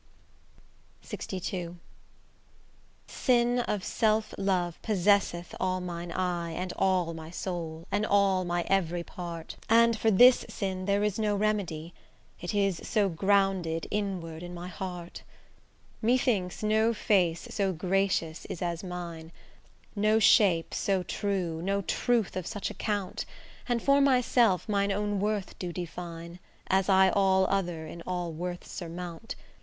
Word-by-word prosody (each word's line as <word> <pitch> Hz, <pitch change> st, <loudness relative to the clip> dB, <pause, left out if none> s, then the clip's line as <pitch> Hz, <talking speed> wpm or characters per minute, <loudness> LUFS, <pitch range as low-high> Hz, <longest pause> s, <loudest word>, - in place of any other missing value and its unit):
LXII 180 Hz, -2 st, -5 dB, 1.3 s
Sin 245 Hz, -1 st, +2 dB
of 210 Hz, -5 st, -1 dB
self 215 Hz, -1 st, +1 dB
love 180 Hz, -3 st, -1 dB
possesseth 200 Hz, -4 st, +1 dB
all 185 Hz, 0 st, 0 dB
mine 175 Hz, -1 st, -5 dB
eye 175 Hz, -2 st, -2 dB
And 185 Hz, +2 st, -3 dB
all 180 Hz, -3 st, +1 dB
my 160 Hz, -1 st, -8 dB
soul, 170 Hz, -2 st, -5 dB
and 205 Hz, -, +1 dB
all 200 Hz, -3 st, +3 dB
my 175 Hz, -1 st, -1 dB
every 175 Hz, -3 st, +1 dB
part; 170 Hz, -2 st, -7 dB
And 230 Hz, +1 st, +5 dB
for 220 Hz, +1 st, +1 dB
this 245 Hz, +5 st, +7 dB
sin 190 Hz, -2 st, -3 dB
there 200 Hz, +1 st, +2 dB
is 210 Hz, 0 st, 0 dB
no 210 Hz, -1 st, +1 dB
remedy, 195 Hz, -6 st, -1 dB, 0.5 s
It 175 Hz, +4 st, -4 dB
is 195 Hz, -4 st, +1 dB
so 210 Hz, -3 st, +1 dB
grounded 190 Hz, -2 st, +1 dB
inward 180 Hz, -6 st, -3 dB
in 175 Hz, 0 st, -7 dB
my 175 Hz, +1 st, -6 dB
heart. 180 Hz, -2 st, -6 dB, 0.8 s
Methinks 220 Hz, -6 st, +1 dB
no 220 Hz, +2 st, +2 dB
face 180 Hz, -7 st, +1 dB
so 195 Hz, -2 st, 0 dB
gracious 180 Hz, -2 st, 0 dB
is 175 Hz, -, -5 dB
as 170 Hz, 0 st, -2 dB
mine, 170 Hz, -3 st, -6 dB, 0.6 s
No 215 Hz, +1 st, +3 dB
shape 200 Hz, -6 st, +4 dB
so 190 Hz, -2 st, 0 dB
true, 180 Hz, -5 st, -2 dB
no 200 Hz, +2 st, 0 dB
truth 235 Hz, +1 st, 0 dB
of 185 Hz, -2 st, -3 dB
such 205 Hz, -3 st, -3 dB
account; 205 Hz, -4 st, -2 dB, 0.5 s
And 240 Hz, -1 st, 0 dB
for 280 Hz, 0 st, +5 dB
myself 250 Hz, -7 st, +3 dB
mine 200 Hz, -1 st, +1 dB
own 205 Hz, 0 st, -1 dB
worth 205 Hz, -1 st, -2 dB
do 180 Hz, -2 st, -3 dB
define, 170 Hz, 0 st, -7 dB, 0.3 s
As 190 Hz, +1 st, +2 dB
I 190 Hz, 0 st, +6 dB
all 190 Hz, -1 st, +3 dB
other 175 Hz, -5 st, -1 dB
in 170 Hz, +2 st, -9 dB
all 180 Hz, -2 st, -2 dB
worths 175 Hz, +2 st, -6 dB
surmount. 175 Hz, +3 st, -6 dB
190 Hz, 135 wpm, -29 LUFS, 175-205 Hz, 1.3 s, this